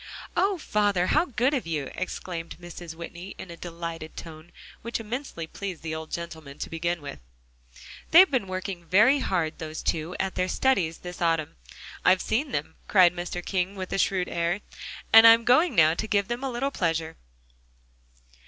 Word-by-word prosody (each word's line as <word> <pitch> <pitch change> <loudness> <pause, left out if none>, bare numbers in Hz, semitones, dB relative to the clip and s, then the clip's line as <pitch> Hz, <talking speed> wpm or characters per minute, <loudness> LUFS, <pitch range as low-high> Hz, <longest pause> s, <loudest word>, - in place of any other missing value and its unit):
"Oh, 390 0 +2
father! 205 - +1
how 310 - +3
good 255 0 0
of 260 - -1
you!" 150 -4 -3
exclaimed 175 -2 -5
Mrs. 175 -1 -9
Whitney 170 +3 -8
in 190 - -9
a - - -8
delighted 165 -2 -7
tone, 160 +1 -10 0.3
which 235 +1 -3
immensely 225 - -5
pleased 185 0 -7
the 160 -1 -3
old 160 0 -6
gentleman, 160 -4 -7
to - - -6
begin 170 0 -2
with. 140 - -7 0.9
"They've 365 +2 +8
been 250 -8 0
working 185 -1 -5
very 215 - +5
hard, 170 -9 -1
those 155 -1 -6
two, 165 +2 -1
at 190 0 -1
their 185 - 0
studies 185 -8 +1
this 180 0 -9
autumn. 165 -3 0 0.5
I've 185 0 +4
seen 260 +6 -1
them," 150 -2 -4
cried 180 -4 +6
Mr. 175 0 -5
King 190 +1 -1
with 185 -1 -5
a - - 0
shrewd 185 -2 +1
air, 170 +3 -1 0.5
"and 225 +1 +10
I'm 230 0 +7
going 285 +9 +4
now 160 -1 +6
to 215 +6 -3
give 200 -2 +1
them 240 +2 -3
a 270 - -1
little 265 +3 -2
pleasure." 165 - -1
180 Hz, 175 wpm, -26 LUFS, 165-220 Hz, 0.9 s, and